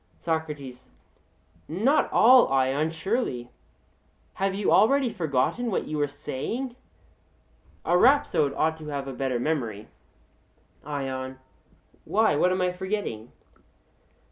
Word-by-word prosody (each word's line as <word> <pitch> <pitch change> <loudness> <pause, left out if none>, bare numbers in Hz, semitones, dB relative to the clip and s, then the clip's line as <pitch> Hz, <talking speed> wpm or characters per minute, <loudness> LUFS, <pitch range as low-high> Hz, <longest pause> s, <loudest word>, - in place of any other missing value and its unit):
SOCRATES: 150 -6 -4 0.8
Not 225 - +1
all, 250 +2 +7
Ion, 135 +3 +1
surely. 160 - -3 0.8
Have 195 0 -1
you 200 0 0
already 250 +5 +4
forgotten 160 - 0
what 195 - -2
you 155 -1 -3
were 145 - +2
saying? 225 - -5 1.1
A 175 - +2
rhapsode 180 - +3
ought 160 0 0
to 155 - -9
have 140 -2 -4
a 135 - -5
better 130 -1 -2
memory. 120 -8 -3 0.9
ION: 130 -2 -4 0.7
Why, 220 -6 +2
what 180 +5 +3
am 185 0 0
I 180 - +1
forgetting? 180 - -4
155 Hz, 115 wpm, -26 LUFS, 135-200 Hz, 1.1 s, all